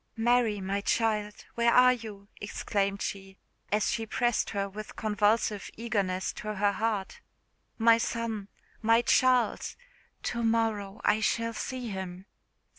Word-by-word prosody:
"Mary, 230 -2 +2
my 195 +1 -2
child, 210 -1 0
where 235 0 +3
are 250 +1 +7
you?" 215 -4 -9
exclaimed 200 -1 -2
she, 195 -1 -6 0.3
as 210 +1 +2
she 225 - -1
pressed 240 +1 +1
her 200 0 -2
with 210 +2 -9
convulsive 210 -1 +1
eagerness 200 -5 -1
to 215 0 -5
her 205 +1 +2
heart. 210 -1 -2 0.6
"My 230 0 +5
son! 225 -3 -3 0.3
my 230 +1 +4
Charles! 250 -3 +2 0.5
to 235 - -2
morrow 225 -2 0
I 215 - +3
shall 230 +1 0
see 250 +1 -4
him. 190 -1 -6
215 Hz, 130 wpm, -29 LUFS, 200-230 Hz, 0.6 s, are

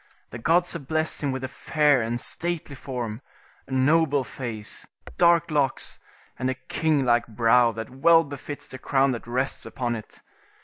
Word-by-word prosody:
The 120 - -7
gods 170 +8 +2
have 155 -6 -7
blessed 160 +1 0
him 145 -2 0
with 130 0 -4
a - - -1
fair 150 -1 +2
and 115 +2 -2
stately 170 +1 -2
form, 125 -4 -5 0.5
a - - -14
noble 145 +1 +3
face, 110 -3 -6 0.3
dark 170 -1 +4
locks, 140 -3 -1 0.4
and 130 - 0
a 130 - -1
king 145 +2 0
like 120 -1 +3
brow 115 +1 +4
that 110 +2 -6
well 165 +5 +5
befits 145 0 -7
the 130 - -9
crown 135 0 +2
that 120 -2 -5
rests 130 +3 -1
upon 120 -3 -3
it. 110 - -10
130 Hz, 170 wpm, -25 LUFS, 120-155 Hz, 0.5 s, well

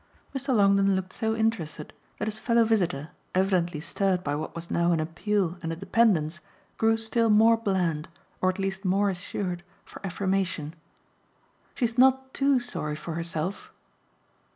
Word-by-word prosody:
Mr. 270 -1 0
Longdon 195 -1 +4
looked 190 0 -3
so 220 0 -1
interested 185 -10 -2 0.2
that 210 - -3
his 215 0 -3
fellow 235 -1 +3
visitor, 180 -10 0 0.3
evidently 180 -4 +1
stirred 185 +3 0
by 145 - -1
what 155 +3 -4
was 170 0 -7
now 170 0 +2
an 165 - +2
appeal 175 +2 -1
and 165 -1 -3
a - - -2
dependence, 175 -4 +2 0.4
grew 225 0 +3
still 225 +1 +1
more 220 +2 +6
bland, 180 -8 -1 0.3
or 185 - +3
at 185 - -2
least 195 0 -3
more 195 +1 +2
assured, 180 -1 -4 0.2
for - - -12
affirmation. 185 -4 -1 1.0
"She's 240 -1 -1
not 265 0 +4
TOO 275 -1 +3
sorry 155 -11 -4
for 160 +2 -6
herself." 170 +3 -4
195 Hz, 155 wpm, -27 LUFS, 170-220 Hz, 1.0 s, more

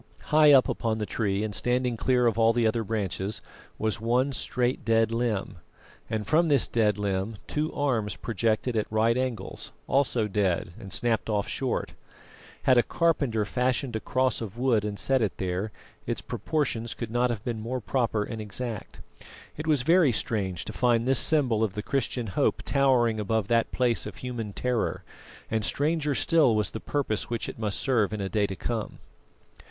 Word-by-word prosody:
High 150 -1 +7
up 135 -3 +6
upon 110 -2 -1
the 105 - -2
tree, 100 -2 -1
and 110 -1 -3
standing 125 +3 0
clear 125 +2 +2
of 115 -1 +2
all 115 0 +5
the 120 0 +1
other 110 +1 +1
branches, 100 -1 -3 0.4
was 110 -1 -1
one 125 +4 +2
straight, 125 0 -1
dead 115 0 +2
limb, 115 -6 -1 0.5
and 110 -1 -2
from 165 +3 +3
this 140 -5 +3
dead 105 -3 +2
limb 100 +1 -2
two 155 +2 -2
arms 120 -8 0
projected 115 +2 -1
at 110 -1 -1
right 110 +2 +3
angles, 125 -6 -3
also 125 -5 +1
dead 95 -4 0
and 95 - -10
snapped 115 -2 0
off 105 -1 0
short. 130 -2 -2 0.7
Had 130 -2 +5
a - - +7
carpenter 140 -9 +1
fashioned 125 +1 -1
a - - 0
cross 130 +1 0
of 110 0 -6
wood 120 -4 +2
and 105 -1 -3
set 135 +3 +1
it 110 - -1
there, 95 +3 -2 0.4
its - - -1
proportions 120 -7 -2
could 115 -2 -5
not 120 +1 +2
have 110 -3 -3
been 115 -3 -3
more 125 +4 -3
proper 115 -3 0
and 110 0 -6
exact. 110 +1 -6 0.5
It 155 +1 -6
was 150 -5 +3
very 165 -1 +5
strange 100 -6 -2
to 110 - -6
find 120 -1 +2
this 135 -1 +4
symbol 125 -8 +3
of 105 -3 -1
the 105 - -3
Christian 125 -2 -1
hope 95 - 0
towering 125 -5 +2
above 105 0 -1
that 115 -1 +2
place 125 -2 +1
of - - -8
human 120 -4 -5
terror, 125 +1 -1 0.5
and 110 -1 0
stranger 150 +1 0
still 155 -9 +3
was 105 -1 0
the 110 - -5
purpose 130 -7 -2
which 115 -1 -2
it - - -7
must 105 -3 -1
serve 115 -7 +1
in 110 - -3
a 95 -1 -2
day 105 -1 +1
to 95 - -5
come. 110 +2 -4
115 Hz, 185 wpm, -27 LUFS, 105-130 Hz, 0.7 s, High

